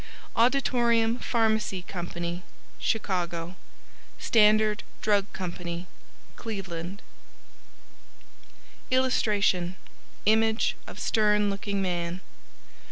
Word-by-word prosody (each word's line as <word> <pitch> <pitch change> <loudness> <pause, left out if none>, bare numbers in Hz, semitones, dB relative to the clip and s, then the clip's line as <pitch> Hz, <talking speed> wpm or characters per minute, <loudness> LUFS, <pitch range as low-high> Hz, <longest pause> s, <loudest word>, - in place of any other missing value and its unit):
Auditorium 235 -2 +3
Pharmacy 220 -5 +1
Co., 175 -1 -4 0.4
Chicago 175 -4 -1 0.6
Standard 215 -1 +4 0.2
Drug 205 -2 +2
Co., 185 -2 -4 0.9
Cleveland 190 -3 -5 1.9
[Illustration: 205 -8 +2 0.5
Image 220 +1 +3
of - - -9
stern 210 -2 +3
looking 200 0 -2
man. 175 0 -2
205 Hz, 65 wpm, -27 LUFS, 180-225 Hz, 1.9 s, Standard